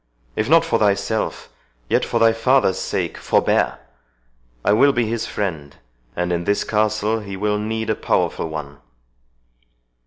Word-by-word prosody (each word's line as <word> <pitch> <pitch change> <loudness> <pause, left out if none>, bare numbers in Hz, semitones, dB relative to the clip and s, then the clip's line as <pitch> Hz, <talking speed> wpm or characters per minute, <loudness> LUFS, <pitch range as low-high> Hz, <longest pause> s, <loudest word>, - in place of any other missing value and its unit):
If 110 +4 -1
not 165 +1 +5
for 115 - +1
thyself, 105 +1 0 0.4
yet - - +1
for - - -1
thy 115 0 +5
father's 115 -4 +2
sake - - -3
forbear! - - +1 0.9
I 105 - +4
will 140 +6 +5
be 120 -2 +1
his 115 +1 -2
friend, 80 -9 -4 0.4
and 90 0 -1
in 85 0 -2
this 100 +2 +1
castle 110 +1 0
he 100 -2 -7
will 105 +1 0
need 110 +1 -2
a - - 0
powerful 80 - -1
one." 75 -2 -7
105 Hz, 150 wpm, -21 LUFS, 95-115 Hz, 0.9 s, not